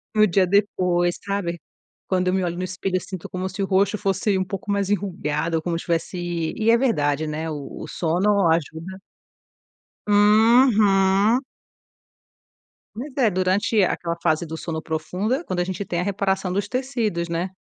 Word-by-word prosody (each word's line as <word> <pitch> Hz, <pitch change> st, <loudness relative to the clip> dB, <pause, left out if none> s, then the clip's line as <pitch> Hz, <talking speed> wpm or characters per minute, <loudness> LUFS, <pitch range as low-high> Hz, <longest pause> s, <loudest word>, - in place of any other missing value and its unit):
no 215 Hz, 0 st, +6 dB
dia 185 Hz, 0 st, +2 dB
depois, 180 Hz, -3 st, +1 dB
sabe, 195 Hz, -4 st, -2 dB, 0.5 s
quando 185 Hz, -1 st, 0 dB
eu -, -, 0 dB
me 190 Hz, 0 st, +1 dB
olho 175 Hz, -1 st, -2 dB
no 180 Hz, -, -3 dB
espelho, 185 Hz, +1 st, -3 dB
eu 185 Hz, -, +1 dB
sinto 185 Hz, -4 st, -8 dB
como 185 Hz, 0 st, -3 dB
se 190 Hz, +2 st, -5 dB
o -, -, +1 dB
rosto 200 Hz, +2 st, +2 dB
fosse 195 Hz, 0 st, 0 dB
um 190 Hz, -, +1 dB
pouco 195 Hz, +2 st, -5 dB
mais 200 Hz, -1 st, 0 dB
enrugada 165 Hz, -5 st, -1 dB
como 170 Hz, 0 st, -2 dB
se -, -, -7 dB
tivesse 170 Hz, +1 st, -2 dB, 0.4 s
e 220 Hz, +1 st, +3 dB
é 230 Hz, -, +5 dB
verdade, 155 Hz, -, +1 dB
né, 155 Hz, +2 st, -3 dB
o 145 Hz, -2 st, -7 dB
o -, -, -7 dB
sono 180 Hz, +4 st, +1 dB
ajuda. 165 Hz, +3 st, -3 dB, 1.1 s
Uhum. 210 Hz, 0 st, +4 dB, 1.5 s
Mas 265 Hz, +7 st, -6 dB
é 245 Hz, -5 st, +4 dB
durante 190 Hz, +3 st, +1 dB
aquela 170 Hz, -2 st, -1 dB
fase 160 Hz, 0 st, +1 dB
do 160 Hz, 0 st, -6 dB
sono 160 Hz, -1 st, -4 dB
profunda 180 Hz, -, -2 dB
quando 185 Hz, -, -3 dB
a -, -, +2 dB
gente 185 Hz, +1 st, -4 dB
tem 175 Hz, -3 st, -3 dB
a -, -, 0 dB
reparação 190 Hz, -1 st, -1 dB
dos 200 Hz, +1 st, -1 dB
tecidos, 235 Hz, -8 st, -2 dB
né, 170 Hz, +2 st, -2 dB
185 Hz, 170 wpm, -23 LUFS, 170-205 Hz, 1.5 s, no